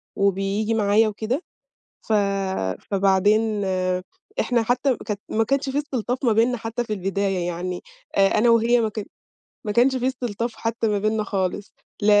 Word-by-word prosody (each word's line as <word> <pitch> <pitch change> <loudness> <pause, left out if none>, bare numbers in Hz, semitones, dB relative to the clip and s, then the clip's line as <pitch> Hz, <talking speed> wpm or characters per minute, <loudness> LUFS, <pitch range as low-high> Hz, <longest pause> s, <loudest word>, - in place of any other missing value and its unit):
وبييجي 200 +3 +1
معايا 215 +1 +3
وكده، 220 - -2 0.7
ف 220 - 0 0.8
فبعدين 205 +2 +2 0.8
إحنا 240 -2 +2
حتّى 250 +2 +1
كانت 210 -1 -3
ما 225 +1 +2
كانش 275 +3 0
في 270 +2 -1
استلطاف 255 -3 -2
ما 235 - +4
بيننا 230 +3 +3
حتّى 230 +1 -3
في 220 - -5
البداية 195 -2 -1
يعني، 175 +1 -4 0.3
آآ، 195 0 +5
أنا 235 +2 +4
وهي 230 +1 +4
ما 225 - +1
كان 215 0 -5 0.6
ما 210 - -1
كانش 255 +4 +4
في 255 0 -1
استلطاف 240 -3 -2
حتّى 230 0 -1
ما 210 -1 +1
بيننا 215 +1 0
خالص، 195 0 -2 0.3
ل - - +1
220 Hz, 155 wpm, -23 LUFS, 200-240 Hz, 0.8 s, آآ